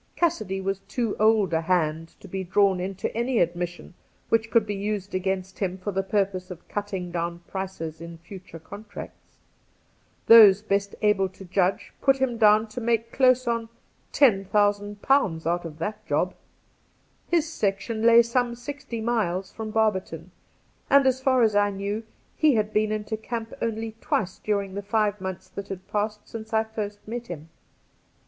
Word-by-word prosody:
Cassidy 215 - 0
was, 195 0 -2
too 235 -4 -1
old 215 -4 +3
a 160 - +2
hand 165 -2 0
to - - -11
be 190 +1 -4
drawn 190 +1 +3
into 190 +2 -4
any 240 +2 0
admission 175 0 -2 0.4
which 225 0 +2
could 230 -2 +3
be 205 - -3
used 200 0 -3
against 190 0 -2
him 190 -2 -1
for 190 +2 -4
the 195 0 0
purpose 195 -2 -1
of 180 -2 -10
cutting 195 -4 -4
down 170 0 -3
prices 165 -5 -5
in 170 0 -8
future 175 0 -11
contracts. 200 +6 -11 0.9
Those 210 -3 +9
best 200 -1 -1
able 200 -2 +3
to 190 +1 -13
judge 185 +1 0
put 270 -1 +4
him 255 -3 -1
down 215 0 +6
to 245 +3 -6
make 230 0 0
close 255 -1 +4
on 230 -1 -1 0.4
£10,000 205 - +2
out 175 +1 0
of 155 -2 -8
that 210 +6 -4
job. 165 +5 +1 0.9
His 335 -2 +2
section 220 -5 -2
lay 235 +1 +7
some 235 0 0
sixty 245 -2 -6
miles 195 -6 -1
from 220 -1 -6
Barberton, 190 -6 -1 0.6
and, 280 0 +6
as 260 0 +2
far 260 -2 +3
as 215 -2 +3
I 205 0 +4
knew, 200 +2 -3 0.3
he 305 -5 +4
had 215 -1 0
been 215 0 +2
into 215 0 -3
camp 225 0 -5
only 225 0 -2
twice 185 -2 -1
during 200 -2 -1
the 200 - -4
five 210 -1 0
months 190 -1 -5
that 200 - -7
had 190 -1 -7
passed 210 0 -2
since 220 0 -8
I 220 0 +3
had 220 - -20
first 205 -2 -5
met 240 +1 -5
him. 165 -2 -8
205 Hz, 170 wpm, -25 LUFS, 185-225 Hz, 0.9 s, Those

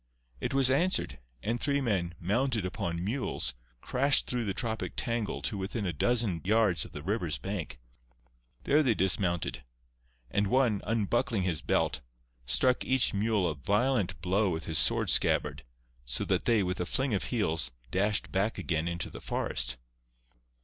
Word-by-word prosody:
It - - -2
was 135 -1 +3
answered; 140 - +1 0.2
and 115 +2 -1
three 140 0 +1
men, 95 -9 -1
mounted 115 +3 0
upon 85 -2 -3
mules, 110 - -1 0.3
crashed 135 +2 +2
through 120 -2 -1
the 100 - -1
tropic 115 -2 -3
tangle 115 -3 -2
to 105 -4 -2
within 100 +3 -3
a 90 - -1
dozen 105 - +1
yards 105 -5 +3
of - - -12
the 75 - -8
river's 90 -5 -1
bank. 85 -11 -5 0.8
There 150 +2 +4
they 125 -7 +2
dismounted; 85 -6 +1 0.7
and 100 0 +1
one, 120 -3 +2
unbuckling 115 0 0
his 85 -4 0
belt, - - 0 0.5
struck 125 - +2
each 130 -1 +2
mule 105 -2 +1
a 80 - -1
violent 100 - 0
blow 95 +3 +2
with 80 -2 -3
his 80 -2 +1
sword - - +3
scabbard, - - +2 0.4
so - - -2
that - - 0
they, 115 -4 +3
with 90 0 -2
a 90 - -2
fling 130 +2 0
of 100 - 0
heels, 80 - +1 0.2
dashed 105 +2 +1
back 100 +4 0
again 80 -1 -1
into 85 0 -3
the - - -9
forest. 60 +1 -1
100 Hz, 160 wpm, -30 LUFS, 85-120 Hz, 0.8 s, There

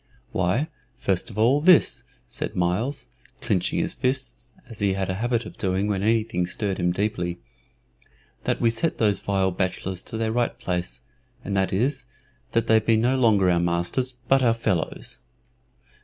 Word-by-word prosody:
"Why, 95 - +1 0.3
first 95 -8 0
of 105 - -10
all, 125 +7 +4
this," 180 0 +5 0.2
said - - -5
Myles, 95 +11 0 0.3
clinching - - 0
his - - 0
fists, 130 -1 -2 0.2
as 115 -3 -10
he 100 -2 +2
had 95 -1 -1
a 95 +3 -4
habit 120 0 0
of - - -10
doing 95 0 0
when 100 -2 0
anything 110 -5 +1
stirred 100 +1 -2
him 90 0 +2
deeply, 90 -3 -1 1.1
"that - - 0
we 115 - +3
set 160 +8 0
those 105 -3 +3
vile 95 -1 +1
bachelors 95 0 -2
to 115 - -3
their 110 0 0
right 120 +1 0
place; 85 -10 -3 0.4
and 100 - -3
that 95 -1 +1
is, 125 +6 0 0.5
that 115 - +2
they 110 0 +5
be 110 +1 +2
no 120 +4 +2
longer 110 -7 +4
our 90 -1 +3
masters, 85 +10 0
but 135 +1 +4
our 115 -3 +3
fellows." 95 -7 -2
105 Hz, 170 wpm, -24 LUFS, 95-120 Hz, 1.1 s, this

